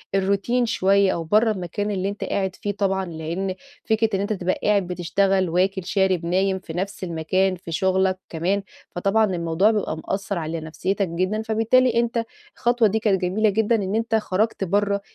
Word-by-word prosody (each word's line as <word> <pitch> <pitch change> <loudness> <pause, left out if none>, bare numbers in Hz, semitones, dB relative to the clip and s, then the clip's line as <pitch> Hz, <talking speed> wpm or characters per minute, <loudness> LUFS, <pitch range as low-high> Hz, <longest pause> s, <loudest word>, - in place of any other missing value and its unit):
الروتين 200 +6 +1
شوية، 200 -3 +3
أو 170 - -3
برَّه 215 +7 +3
المكان 205 +1 -3
اللي 195 -1 -1
أنت 205 - -5
قاعد 190 -1 -2
فيه 205 - -3
طبعًا، 195 -1 -1
لأن 170 +3 -4 0.3
فكرة 220 0 +1
إن - - 0
أنت 205 +2 -1
تبقى 185 -2 -1
قاعد 200 -3 +2
بتشتغل، 185 +1 +1
واكل، 185 +2 0
شارب، 190 -3 +1
نايم 190 +2 +1
في 165 - -9
نفس 195 +3 -4
المكان، 185 +3 0
في 175 -1 -10
شغَلك 190 +1 +1
كمان، 185 +5 -1 0.3
فطبعًا 200 +5 +2
الموضوع 175 +1 +1
بيبقى 205 -7 -2
مأثِّر 195 +4 -3
على 160 0 -3
نفسيَّتك 185 +5 -2
جدًا. 185 +6 -1
فبالتالي، 225 +3 +2
أنت 235 0 0 0.3
الخطوة 240 -2 +3
دي 220 +3 0
كانت 200 -4 +1
جميلة 200 +4 +2
جدًا 220 +3 +2
إن 200 -2 -1
أنت 225 0 0
خَرَجت 215 0 0
برَّه 200 +2 +1
195 Hz, 175 wpm, -23 LUFS, 185-210 Hz, 0.3 s, شوية